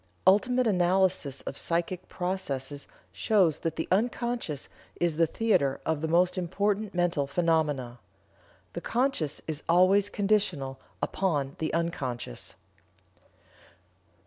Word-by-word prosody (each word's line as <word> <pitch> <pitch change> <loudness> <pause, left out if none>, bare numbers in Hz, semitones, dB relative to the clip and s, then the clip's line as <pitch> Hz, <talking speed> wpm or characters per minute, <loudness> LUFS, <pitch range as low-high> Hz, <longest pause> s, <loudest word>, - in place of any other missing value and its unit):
Ultimate 245 +7 +4
analysis 180 - +2
of - - -5
psychic 175 +2 -1
processes 145 -7 -3 0.2
shows 190 -8 +2
that 165 -1 -2
the 160 - -3
unconscious 235 - -1 0.3
is 170 -3 +1
the 165 0 +4
theater 155 -9 +1
of 160 -2 0
the 160 - -1
most 180 +3 +3
important 200 +3 -1
mental 175 -5 +1
phenomena. 145 -6 0 0.7
The - - -5
conscious 235 - 0
is 155 -2 -3
always 190 +4 +5
conditional 195 -11 0 0.2
upon 145 -8 0
the 155 - -1
unconscious." 135 - -3
175 Hz, 110 wpm, -28 LUFS, 145-195 Hz, 0.7 s, always